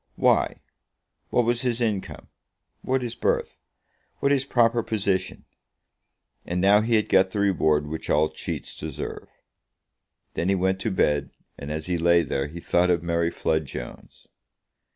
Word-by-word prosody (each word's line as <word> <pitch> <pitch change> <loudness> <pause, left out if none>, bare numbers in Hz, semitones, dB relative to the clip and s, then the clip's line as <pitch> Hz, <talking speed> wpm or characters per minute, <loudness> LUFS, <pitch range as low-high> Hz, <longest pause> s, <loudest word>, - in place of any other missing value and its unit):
Why, - - +2 0.7
what 120 - +2
was 120 +1 +1
his 125 -2 -1
income? 110 -5 -2 0.6
What 130 0 0
his 120 -2 -3
birth? - - -1 0.6
What 140 - +1
his 135 -1 +2
proper 120 -2 +3
position? 100 -4 -2 1.0
And 90 +1 -3
now 100 +3 +5
he 115 +1 +1
had 105 - +2
got 95 0 +4
the 100 - -4
reward 80 -7 +2
which 80 +2 -6
all 75 +1 +3
cheats - - -6
deserve. 80 -3 -6 1.0
Then 85 - -1
he 100 - +3
went 95 +1 0
to 110 - -1
bed, 75 -7 +1 0.3
and 70 +1 -7
as 80 0 -3
he 90 -2 -1
lay 85 0 +4
there, 70 -2 -2
he 85 +4 -9
thought 90 +1 +2
of 85 -1 +2
Mary 85 0 +1
Flood 80 -3 -1
Jones. - - -9
95 Hz, 155 wpm, -25 LUFS, 80-110 Hz, 1.0 s, now